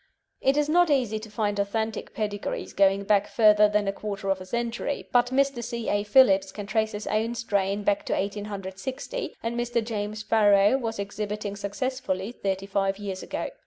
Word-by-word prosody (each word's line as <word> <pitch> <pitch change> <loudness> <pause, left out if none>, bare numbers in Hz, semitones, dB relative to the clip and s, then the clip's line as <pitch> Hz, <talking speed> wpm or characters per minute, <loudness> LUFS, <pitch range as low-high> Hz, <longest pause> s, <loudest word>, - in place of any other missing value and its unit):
It 270 +2 +3
is 295 0 +2
not 345 +2 +4
easy 245 -7 +1
to 215 0 -10
find 205 -1 -1
authentic 220 +2 -2
pedigrees 205 -2 -3
going 195 0 +3
back 205 0 +2
further 210 -2 +5
than 210 -1 +1
a 195 - 0
quarter 200 -1 -3
of 190 -1 -1
a 185 - -9
century, 235 +5 -3
but 245 0 +4
Mr. 265 -1 +1
C. 235 -1 -4
A. 205 - +2
Phillips 200 -4 +5
can 205 +1 -7
trace 220 +2 0
his 210 0 -5
own 225 +2 0
strain 200 -3 -1
back 200 0 0
to - - 0
1860, 205 - -4
and 230 +1 -2
Mr. 240 -1 -1
James 210 -1 -4
Farrow 205 0 +4
was 225 -3 -3
exhibiting 205 0 -4
successfully 205 0 -3
thirty 195 -4 -3
five 195 0 0
years 195 -2 -5
ago. - - -4
210 Hz, 180 wpm, -26 LUFS, 200-235 Hz, -, further